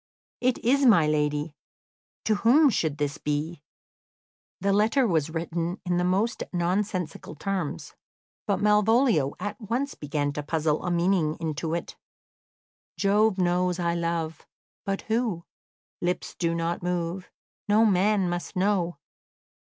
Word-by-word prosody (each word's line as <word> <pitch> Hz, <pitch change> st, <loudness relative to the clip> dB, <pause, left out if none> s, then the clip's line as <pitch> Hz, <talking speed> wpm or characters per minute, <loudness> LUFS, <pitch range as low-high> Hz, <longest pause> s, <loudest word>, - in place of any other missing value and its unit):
It 255 Hz, 0 st, +1 dB
is 275 Hz, +4 st, +3 dB
my 210 Hz, -, +6 dB
lady. 150 Hz, 0 st, 0 dB, 0.7 s
To 220 Hz, -, +3 dB
whom 270 Hz, +7 st, +5 dB
should 155 Hz, -7 st, -1 dB
this 145 Hz, +1 st, -2 dB
be?" 150 Hz, +2 st, -3 dB, 1.0 s
The 195 Hz, +1 st, +1 dB
letter 220 Hz, +6 st, +3 dB
was 160 Hz, -5 st, +1 dB
written 170 Hz, +2 st, -3 dB
in 175 Hz, -1 st, 0 dB
the 175 Hz, -, +1 dB
most 195 Hz, +6 st, 0 dB
nonsensical 180 Hz, -2 st, -2 dB
terms, 180 Hz, -, -4 dB, 0.5 s
but -, -, +2 dB
Malvolio 210 Hz, -, +3 dB
at 205 Hz, +4 st, -5 dB
once 240 Hz, +6 st, -2 dB
began 145 Hz, -1 st, -2 dB
to 150 Hz, -, -3 dB
puzzle 155 Hz, 0 st, -1 dB
a 180 Hz, -, -1 dB
meaning 170 Hz, -2 st, +1 dB
into 160 Hz, 0 st, -2 dB
it. 170 Hz, -, -5 dB, 1.0 s
"Jove 205 Hz, 0 st, +3 dB
knows 180 Hz, 0 st, +1 dB
I 170 Hz, -1 st, 0 dB
love: 170 Hz, -2 st, -3 dB, 0.4 s
But 195 Hz, -1 st, -2 dB
who? 220 Hz, -6 st, -1 dB, 0.6 s
Lips 180 Hz, +1 st, -2 dB
do 170 Hz, -1 st, -1 dB
not 170 Hz, +1 st, -2 dB
move; 180 Hz, +1 st, -3 dB, 0.4 s
No 215 Hz, +2 st, +5 dB
man 200 Hz, -1 st, +3 dB
must 175 Hz, 0 st, -4 dB
know." 185 Hz, -3 st, +1 dB
175 Hz, 130 wpm, -26 LUFS, 160-210 Hz, 1.0 s, my